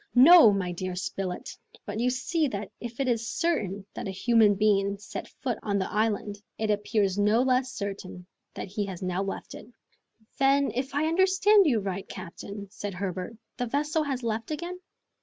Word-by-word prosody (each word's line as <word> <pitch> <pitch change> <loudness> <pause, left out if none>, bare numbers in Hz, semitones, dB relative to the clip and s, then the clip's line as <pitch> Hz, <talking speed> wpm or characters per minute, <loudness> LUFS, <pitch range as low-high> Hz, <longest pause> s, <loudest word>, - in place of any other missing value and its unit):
"No, 280 -1 +9
my 190 -3 -1
dear 185 +1 -4
Spilett; 185 0 -4 0.4
but 205 +1 -4
you 245 +2 +2
see 300 +5 0
that 210 -4 -5
if 240 +1 -8
it 270 - 0
is 230 -2 0
certain 205 - -1
that - - -5
a - - -3
human 210 +2 +3
being 200 -1 +2
set 205 - -7
foot 245 -4 -4
on 200 -2 -1
the 190 - -2
island, 210 -1 -1 0.2
it 215 -1 0
appears 205 -1 0
no 210 +4 +4
less 255 0 +1
certain 195 -6 -6 0.3
that - - -5
he 205 +2 -2
has 185 -2 -6
now 185 +1 -1
left 195 0 -5
it." - - -10 0.7
"Then, 275 +1 +3
if 260 +3 -3
I 295 +2 +2
understand 380 +3 +4
you 235 -7 +2
right, 195 0 -4
captain," 200 +3 -8
said 205 -2 -6
Herbert, 185 +3 -4 0.2
"the 245 - -2
vessel 300 +5 0
has 270 -4 -3
left 225 0 -2
again?" 345 +4 -4
215 Hz, 180 wpm, -27 LUFS, 195-265 Hz, 0.7 s, No